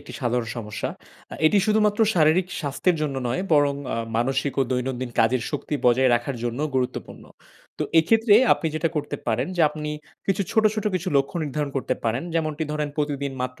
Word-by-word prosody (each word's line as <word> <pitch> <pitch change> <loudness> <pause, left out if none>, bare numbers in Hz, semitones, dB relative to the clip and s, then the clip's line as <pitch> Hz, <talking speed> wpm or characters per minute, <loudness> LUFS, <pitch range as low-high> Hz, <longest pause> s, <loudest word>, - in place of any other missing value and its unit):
একটি 145 - -11
সাধারণ 120 -2 0
সমস্যা। 105 -2 -4 0.4
আ - - -5
এটি 200 +6 +4
শুধুমাত্র 210 0 +2
শারীরিক 165 +2 +4
স্বাস্থ্যের 165 +5 0
জন্য 145 -3 -1
নয়, 180 +10 -1
বরং 145 -2 +4 0.2
আ - - -3 0.2
মানসিক 135 +3 0
ও - - +5
দৈনন্দিন 125 0 -2
কাজের 115 +1 +2
শক্তি 150 0 -3
বজায় 125 +1 +4
রাখার 120 +2 -2
জন্যও 125 +6 -1
গুরুত্বপূর্ণ। 125 -1 -3 0.5
তো - - 0 0.2
এক্ষেত্রে 225 +5 +4 0.2
আপনি 165 - -1
যেটা 165 +1 +1
করতে 145 -1 -2
পারেন 115 0 0
যে 170 - +3
আপনি 150 0 -5 0.4
কিছু 195 0 +1
ছোট, 220 -1 +3
ছোট 215 - -3
কিছু 185 +1 -1
লক্ষ্য 140 +5 0
নির্ধারণ 145 0 -3
করতে 130 -1 -1
পারেন। 115 +5 0
যেমনটি 155 -1 -1
ধরেন 150 -1 -1
প্রতিদিন 145 -2 -2
মাত্র 125 0 -5
145 Hz, 180 wpm, -24 LUFS, 125-165 Hz, 0.5 s, ও